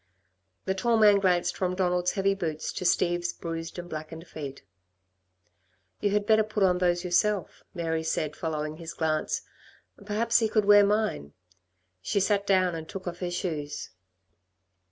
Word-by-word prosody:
The 190 Hz, -, +1 dB
tall 230 Hz, +4 st, +1 dB
man 210 Hz, -2 st, +6 dB
glanced 180 Hz, -3 st, +1 dB
from 185 Hz, -1 st, -1 dB
Donald's 180 Hz, -1 st, +1 dB
heavy 195 Hz, 0 st, +2 dB
boots 160 Hz, -5 st, -3 dB
to 185 Hz, -, -4 dB
Steve's 175 Hz, 0 st, +1 dB
bruised 165 Hz, 0 st, -6 dB
and 175 Hz, 0 st, -6 dB
blackened 160 Hz, +1 st, -7 dB
feet. 140 Hz, -5 st, -8 dB, 1.4 s
"You 205 Hz, -, +1 dB
had 205 Hz, 0 st, +1 dB
better 220 Hz, 0 st, +5 dB
put 215 Hz, -1 st, -1 dB
on 180 Hz, -1 st, +3 dB
those 175 Hz, -1 st, +1 dB
yourself," 190 Hz, +2 st, 0 dB
Mary 165 Hz, -2 st, -1 dB
said, 155 Hz, -1 st, -2 dB
following 155 Hz, -1 st, -3 dB
his 165 Hz, 0 st, -8 dB
glance, 155 Hz, -1 st, -1 dB, 0.6 s
"perhaps 225 Hz, +3 st, +2 dB
he 220 Hz, -2 st, +1 dB
could 215 Hz, -1 st, +2 dB
wear 205 Hz, 0 st, +8 dB
mine." 200 Hz, -, 0 dB, 0.7 s
She 200 Hz, -, 0 dB
sat 200 Hz, +1 st, +1 dB
down 185 Hz, -2 st, +3 dB
and 160 Hz, -1 st, -6 dB
took 190 Hz, -1 st, -7 dB
off 175 Hz, 0 st, -5 dB
her 180 Hz, -, -2 dB
shoes. 155 Hz, -5 st, -4 dB
180 Hz, 155 wpm, -27 LUFS, 165-200 Hz, 1.4 s, wear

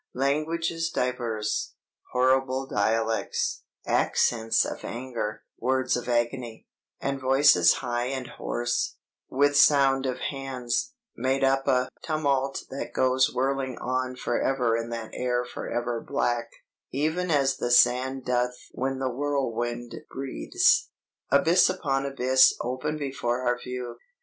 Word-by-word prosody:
_' -, -, -56 dB, 0.2 s
("'Languages 165 Hz, +4 st, 0 dB
diverse, 120 Hz, -6 st, -2 dB, 0.4 s
horrible 130 Hz, +1 st, +2 dB
dialects, 110 Hz, -1 st, 0 dB, 0.2 s
Accents 115 Hz, -1 st, +2 dB
of -, -, -6 dB
anger, 115 Hz, -3 st, -5 dB, 0.2 s
words 130 Hz, 0 st, +1 dB
of 125 Hz, 0 st, -4 dB
agony, 120 Hz, -1 st, -1 dB, 0.3 s
And 140 Hz, -1 st, -3 dB
voices 135 Hz, -9 st, +5 dB
high 120 Hz, 0 st, -1 dB
and 130 Hz, -1 st, -3 dB
hoarse, 120 Hz, 0 st, -2 dB, 0.3 s
with 145 Hz, +2 st, +2 dB
sound 135 Hz, -2 st, +5 dB
of 130 Hz, -, -2 dB
hands, 135 Hz, -, -3 dB, 0.2 s
Made 130 Hz, +3 st, 0 dB
up 135 Hz, 0 st, +2 dB
a 125 Hz, -2 st, +3 dB
tumult 140 Hz, -4 st, 0 dB
that 135 Hz, -, -5 dB
goes 130 Hz, 0 st, +3 dB
whirling 130 Hz, 0 st, -1 dB
on 130 Hz, 0 st, -2 dB
Forever 125 Hz, -1 st, 0 dB
in 115 Hz, 0 st, -3 dB
that 115 Hz, -2 st, -5 dB
air 125 Hz, -1 st, -1 dB
forever 120 Hz, -1 st, -3 dB
black, 120 Hz, -4 st, -1 dB, 0.4 s
Even 160 Hz, +6 st, -1 dB
as 140 Hz, -4 st, +2 dB
the 120 Hz, -, -2 dB
sand 125 Hz, +2 st, +3 dB
doth 125 Hz, 0 st, 0 dB, 0.2 s
when 135 Hz, +1 st, -2 dB
the 130 Hz, 0 st, -1 dB
whirlwind 120 Hz, -3 st, -2 dB, 0.2 s
breathes.') 135 Hz, 0 st, +1 dB, 0.4 s
"Abyss 165 Hz, +6 st, +5 dB
upon 135 Hz, -2 st, -1 dB
abyss 130 Hz, -1 st, +4 dB
open 130 Hz, +5 st, -3 dB
before 130 Hz, -4 st, -2 dB
our 120 Hz, 0 st, +1 dB
view. 125 Hz, -1 st, -6 dB
130 Hz, 125 wpm, -26 LUFS, 120-135 Hz, 0.4 s, voices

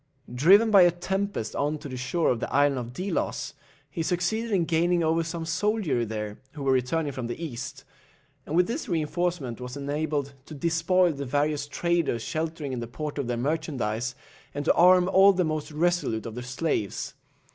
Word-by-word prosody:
Driven 195 Hz, -, +6 dB
by 200 Hz, -2 st, +8 dB
a 175 Hz, -, +7 dB
tempest 190 Hz, -, -3 dB
on 150 Hz, +2 st, 0 dB
to 145 Hz, -, -8 dB
the 130 Hz, -, -6 dB
shore 125 Hz, +7 st, 0 dB
of 120 Hz, -, -1 dB
the -, -, -4 dB
Island 145 Hz, -1 st, +3 dB
of 120 Hz, -1 st, -6 dB
Delos, 185 Hz, +10 st, -3 dB, 0.3 s
he 170 Hz, -, -5 dB
succeeded 180 Hz, +7 st, -1 dB
in 190 Hz, -6 st, +2 dB
gaining 170 Hz, +1 st, +2 dB
over 165 Hz, +1 st, +2 dB
some 165 Hz, 0 st, -4 dB
soldiery 175 Hz, -, 0 dB
there, 105 Hz, -1 st, -5 dB
who 145 Hz, -2 st, -7 dB
were 135 Hz, -, +2 dB
returning 135 Hz, +4 st, +1 dB
from 130 Hz, -3 st, -5 dB
the 120 Hz, -, -5 dB
East, 150 Hz, -9 st, -6 dB, 0.6 s
and 155 Hz, -, -2 dB
with 180 Hz, +1 st, +5 dB
this 250 Hz, -, -4 dB
reinforcement 160 Hz, -, -1 dB
was 125 Hz, +2 st, -6 dB
enabled 145 Hz, 0 st, -2 dB
to 155 Hz, -, -8 dB
despoil 170 Hz, +3 st, +2 dB
the 140 Hz, -1 st, -5 dB
various 145 Hz, +2 st, 0 dB
traders 165 Hz, -6 st, 0 dB
sheltering 155 Hz, -3 st, -3 dB
in 125 Hz, -, -3 dB
the 120 Hz, -, -5 dB
port 150 Hz, +4 st, -5 dB
of 135 Hz, -, -2 dB
their 120 Hz, -1 st, -1 dB
merchandize, 125 Hz, -4 st, -2 dB, 0.4 s
and 145 Hz, 0 st, -3 dB
to -, -, +5 dB
arm 180 Hz, +1 st, +6 dB
all 195 Hz, +1 st, +6 dB
the 185 Hz, -1 st, +1 dB
most 155 Hz, -1 st, -3 dB
resolute 160 Hz, -8 st, 0 dB
of 115 Hz, -, -5 dB
the 125 Hz, -, -6 dB
slaves. 125 Hz, -, -2 dB
155 Hz, 190 wpm, -26 LUFS, 130-175 Hz, 0.6 s, by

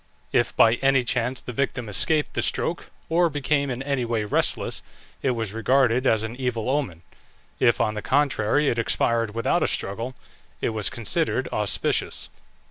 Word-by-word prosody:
If -, -, +1 dB
by 115 Hz, +1 st, +5 dB
any 135 Hz, -1 st, +3 dB
chance 125 Hz, +1 st, -1 dB
the -, -, -7 dB
victim 125 Hz, -2 st, -2 dB
escaped 150 Hz, +9 st, +2 dB
the -, -, 0 dB
stroke, -, -, -1 dB, 0.2 s
or 170 Hz, +1 st, +3 dB
became 145 Hz, -1 st, 0 dB
in 125 Hz, +1 st, -3 dB
any 140 Hz, -2 st, -1 dB
way 115 Hz, -2 st, -1 dB
restless, 105 Hz, -, -1 dB, 0.4 s
it 135 Hz, -, +1 dB
was 110 Hz, -3 st, -3 dB
regarded 125 Hz, +2 st, +2 dB
as 110 Hz, -1 st, +3 dB
an 110 Hz, +2 st, -5 dB
evil 125 Hz, -2 st, -1 dB
omen; 100 Hz, -, -2 dB, 0.6 s
if, -, -, +3 dB
on 105 Hz, -, +1 dB
the 105 Hz, -, -4 dB
contrary, 140 Hz, 0 st, +1 dB
it 120 Hz, -, +1 dB
expired 115 Hz, -1 st, +1 dB
without 115 Hz, -, +1 dB
a -, -, +2 dB
struggle, 115 Hz, +6 st, -3 dB, 0.4 s
it -, -, 0 dB
was 110 Hz, -3 st, 0 dB
considered 115 Hz, -6 st, -1 dB
auspicious. -, -, 0 dB
120 Hz, 165 wpm, -24 LUFS, 110-135 Hz, 0.6 s, by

